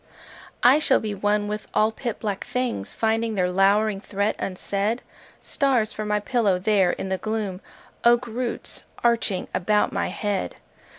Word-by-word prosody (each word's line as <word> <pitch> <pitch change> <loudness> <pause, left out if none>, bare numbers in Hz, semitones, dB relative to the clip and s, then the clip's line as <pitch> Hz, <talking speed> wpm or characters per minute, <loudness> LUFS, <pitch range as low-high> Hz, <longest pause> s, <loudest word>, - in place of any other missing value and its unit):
I 260 +5 +7
shall 285 -3 +4
be 215 -1 -3
one 205 +1 0
with 210 0 -4
all 215 +1 +4
pit 235 0 -5
black 205 -3 -3
things 250 - -3
Finding 225 0 0
their 180 -2 +1
lowering 200 +2 +3
threat 200 +1 -1
unsaid: 200 +4 -2 0.4
Stars 260 -6 0
for 215 - -4
my 210 0 +1
pillow 210 -3 +1
there 190 -1 +2
in 190 - -5
the 190 -1 -1
gloom,— 210 -3 -3 0.4
Oak 240 +1 +5
roots 240 +1 -5 0.2
arching 230 -5 +1
about 210 +3 +2
my - - 0
head! 205 -2 -2
210 Hz, 155 wpm, -24 LUFS, 195-230 Hz, 0.4 s, I